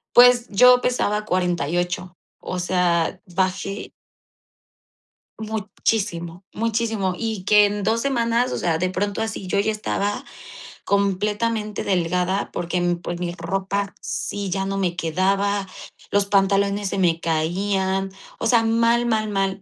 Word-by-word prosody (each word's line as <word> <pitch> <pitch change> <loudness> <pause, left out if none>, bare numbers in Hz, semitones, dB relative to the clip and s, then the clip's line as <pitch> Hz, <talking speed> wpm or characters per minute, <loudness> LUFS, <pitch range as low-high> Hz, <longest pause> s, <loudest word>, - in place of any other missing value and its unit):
Pues, 245 0 +7
yo 250 +5 +6
pesaba 215 -4 0
48, 175 0 -1 0.2
o 185 - -4
sea, 180 -1 +1 0.2
bajé 190 +2 -1 1.5
muchísimo, 205 -5 -2
muchísimo 220 -4 -1
y 220 -4 -3
que 210 +1 +6
en 205 0 -3
2 220 +3 +1
semanas, 240 -2 +1
o - - -1
sea, 165 -2 0
de 185 +2 0
pronto 200 +3 -2
así 220 -4 -4
yo 200 - +1
ya 215 +2 +2
estaba 205 -1 -2 0.6
completamente 210 +2 0
delgada 180 +1 0
porque, 175 +1 -2 0.2
pues, 175 0 -4
mi 175 -1 -3
ropa 195 +3 -2
sí 200 -1 -4
ya 195 +1 -1
no 195 0 -2
me 180 -3 0
quedaba, 195 +4 0 0.4
los 200 0 +2
pantalones 200 0 +2
se - - -3
me 170 -3 +2
caían, 190 +4 0 0.3
o - - 0
sea, 235 -2 +4
mal, 230 +1 +2
mal, 220 -2 +1
mal. 195 -1 -1
200 Hz, 130 wpm, -22 LUFS, 180-215 Hz, 1.5 s, Pues